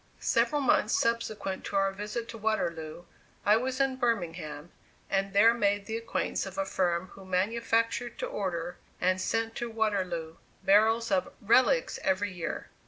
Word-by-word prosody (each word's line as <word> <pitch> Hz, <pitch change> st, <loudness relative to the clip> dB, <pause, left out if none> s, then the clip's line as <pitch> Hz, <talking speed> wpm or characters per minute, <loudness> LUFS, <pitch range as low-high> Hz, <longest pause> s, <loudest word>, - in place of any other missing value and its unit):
Several 295 Hz, -1 st, +2 dB
months 235 Hz, -4 st, +3 dB
subsequent 225 Hz, -4 st, -1 dB
to -, -, -5 dB
our 195 Hz, 0 st, +3 dB
visit 210 Hz, +4 st, -5 dB
to 230 Hz, -, -7 dB
Waterloo, 170 Hz, -7 st, -2 dB, 0.4 s
I 210 Hz, -, +6 dB
was 255 Hz, +3 st, -1 dB
in 270 Hz, -1 st, +1 dB
Birmingham, 175 Hz, -, -2 dB, 0.4 s
and 195 Hz, 0 st, +1 dB
there 215 Hz, +3 st, +6 dB
made 205 Hz, -3 st, +1 dB
the 220 Hz, -, -4 dB
acquaintance 230 Hz, -3 st, -2 dB
of 190 Hz, 0 st, -9 dB
a 195 Hz, -, 0 dB
firm 180 Hz, -1 st, 0 dB
who 195 Hz, -, -13 dB
manufactured 230 Hz, +5 st, 0 dB
to -, -, -2 dB
order, 175 Hz, -3 st, -3 dB, 0.2 s
and 185 Hz, +1 st, +1 dB
sent 225 Hz, +3 st, -1 dB
to 240 Hz, -, -3 dB
Waterloo, 185 Hz, -7 st, -1 dB, 0.3 s
barrels 220 Hz, +3 st, +4 dB
of 190 Hz, -2 st, +1 dB
"relics" 260 Hz, -, +3 dB
every 195 Hz, +1 st, 0 dB
year. 170 Hz, -2 st, -5 dB
205 Hz, 155 wpm, -29 LUFS, 185-230 Hz, 0.4 s, I